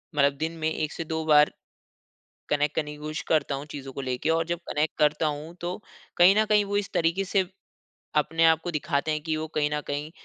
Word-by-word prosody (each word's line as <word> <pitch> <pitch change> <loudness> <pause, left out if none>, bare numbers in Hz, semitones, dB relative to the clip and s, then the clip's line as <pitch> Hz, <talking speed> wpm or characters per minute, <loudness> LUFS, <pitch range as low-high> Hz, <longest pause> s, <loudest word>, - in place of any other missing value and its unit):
मतलब 140 -1 +4
दिन 160 +2 -2
में 155 0 0
1 155 -1 -2
से 165 - -4
2 160 0 -3
बार 150 -1 +6 1.0
कनेक्ट 150 0 +1
करने 150 -2 -1
की 150 - -9
कोशिश 155 +1 -5
करता 145 -3 +2
हूँ 140 - -6
चीज़ों 135 -2 -7
को - - -4
लेके 130 +4 -2
और 165 0 +2
जब 170 0 -2
कनेक्ट 150 +1 -1
करता 150 +1 +3
हूँ 150 +3 -5
तो 175 +1 -3 0.4
कहीं 180 +3 +7
न 215 - +4
कहीं 210 -1 +3
वो 205 0 -1
इस 205 -1 -2
तरीके 170 +4 +1
से 195 0 +1 0.7
अपने 165 +2 +2
आपको 160 +2 +3
दिखाते 150 0 -1
हैं 155 - -1
कि 160 -1 -1
वो 155 - -3
कहीं 150 -1 +2
न 150 - 0
कहीं 145 +2 -3
155 Hz, 225 wpm, -26 LUFS, 150-165 Hz, 1.0 s, कहीं